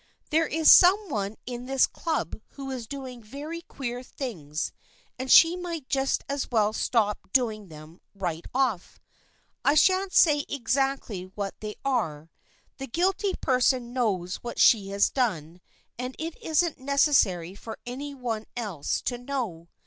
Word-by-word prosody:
There 320 +1 +3
is 320 +1 +5
some 385 +2 +7
one 205 -4 -2
in 245 0 -6
this 270 -1 +4
Club 310 - -3
who 270 -1 -6
is 245 -4 -5
doing 260 -3 -7
very 290 +9 -7
queer 245 -6 -6
things, 170 - -5 0.5
and 260 0 -2
she 330 +1 +8
might 340 -6 -5
just 270 0 0
as 280 0 -3
well 215 -3 +2
stop 215 -3 +1
doing 220 -5 +1
them 155 +1 -13
right 175 -4 -4
off. 250 -8 -1 0.6
I 285 - +4
shan't 375 +4 +4
say 295 -5 +5
exactly 270 -6 -1
what 200 -1 -3
they 215 -1 -6
are. 165 - -1 0.5
The 270 - -5
guilty 375 - 0
person 250 -2 +1
knows 195 -8 -1
what 240 - -7
she 200 -4 +5
has 200 0 +2
done 180 - -2 0.4
and 250 +1 -4
it 320 +1 -5
isn't 320 0 +1
necessary 260 - +2
for 220 +3 -9
any 280 +4 -6
one 230 -4 -3
else 200 -11 -2
to 245 -1 -2
know. 235 -11 -4
250 Hz, 150 wpm, -27 LUFS, 205-280 Hz, 0.6 s, she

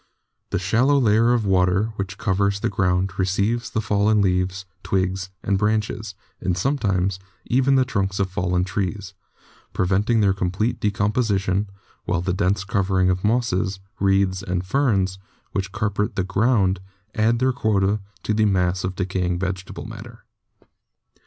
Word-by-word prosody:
The - - 0
shallow 120 +10 +2
layer 115 -2 +4
of 120 -3 +1
water 95 +3 +2
which 95 -1 -5
covers 100 +1 +1
the 115 - +1
ground 95 -1 0
receives 100 +6 0
the 110 - -1
fallen 105 0 +2
leaves, 95 0 0 0.2
twigs 95 0 -1
and 100 -2 +1
branches, 105 0 -1 0.2
and 90 -1 -1
sometimes 95 -6 0 0.3
even 135 +2 +3
the 130 -1 +4
trunks 95 -6 -1
of 95 - +2
fallen 90 -1 0
trees, 95 +1 -3 0.6
preventing 100 +5 +1
their 100 -2 +3
complete 95 +5 -1
decomposition, 100 -2 0 0.4
while 90 - 0
the 90 0 -1
dense 95 0 +1
covering 95 -2 +1
of 90 0 -2
mosses, 105 -4 0 0.2
reeds 95 -1 +2
and 90 -1 -2
ferns 95 -6 +1 0.3
which 95 -1 -2
carpet 105 0 -1
the 95 - 0
ground 100 -1 +2 0.3
add 110 +2 +2
their 130 +2 +2
quota 105 -3 +1 0.2
to 110 - 0
the 110 0 +2
mass 90 -2 +1
of 95 0 -3
decaying 90 -1 -1
vege 95 +1 -3
table - - -8
matter. - - -10
100 Hz, 145 wpm, -23 LUFS, 95-110 Hz, 0.6 s, layer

